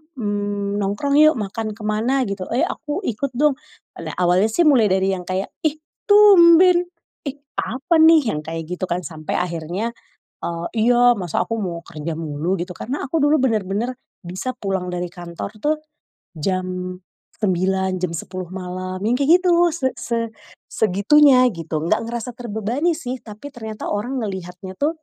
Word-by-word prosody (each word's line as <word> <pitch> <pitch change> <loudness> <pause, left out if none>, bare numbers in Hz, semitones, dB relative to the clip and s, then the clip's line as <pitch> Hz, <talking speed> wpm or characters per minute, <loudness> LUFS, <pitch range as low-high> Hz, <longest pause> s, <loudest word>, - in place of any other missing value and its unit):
mmm, 205 -3 -2
nongkrong 205 +9 +1
yuk 310 -1 +6
makan 215 0 -4
ke 220 - -11
mana 230 +6 +1
gitu," 200 -4 -4
"Eee, 245 +4 0
aku 300 +6 -3
ikut 255 - -3
dong." 295 +1 +2 0.4
Alak - - -6
awalnya 180 +3 +3
sih 225 +10 +2
mulai 265 -9 +5
dari 190 0 +2
yang 180 -2 -4
kayak, 185 +1 -2 0.2
"Ih 300 - -2 0.3
tumben, 360 -3 +7 0.4
ih 280 - -3 0.2
apa 300 +8 0
nih," 315 -7 +6
yang 150 - -2
kayak 165 +2 -5
gitu 185 +1 -2
kan, 175 +1 -1
sampe 155 -1 -6
akhirnya, 175 +5 -2 0.6
eee, 170 0 -3 0.2
"Iya 245 -1 +5
masa 180 -5 -1
aku 230 - -2
mau 175 -5 -3
kerja 165 -1 -5
mulu," 160 +3 -2
gitu 180 - -5
kan. - - -6
Karena 285 - -2
aku 325 - 0
dulu 295 -1 +4
bener-bener 215 +4 -2 0.2
bisa 185 +9 -5
pulang 190 -2 -2
dari 175 0 -3
kantor 175 +2 -7
tuh, 305 +1 +2 0.6
jam 185 +2 -3 0.4
09:00, 190 -1 +1
jam 180 -2 -1
10:00 185 +2 -5
malam, 185 0 -5
yang 235 - +2
kayak 315 +6 +5
gitu, 365 - +3 0.2
se 260 -6 0
se 230 -1 -2 0.4
segitunya, 250 +7 +5
gitu. 165 -3 -4
Nggak 170 - +2
ngerasa 235 +1 -4
terbebani 240 - -1
sih, 255 -4 -5
tapi 215 +6 -10
ternyata 220 -3 -6
orang 240 +6 -2
ngeliatnya 190 -1 -6
tuh, 300 +3 +1
205 Hz, 165 wpm, -21 LUFS, 185-260 Hz, 0.6 s, tumben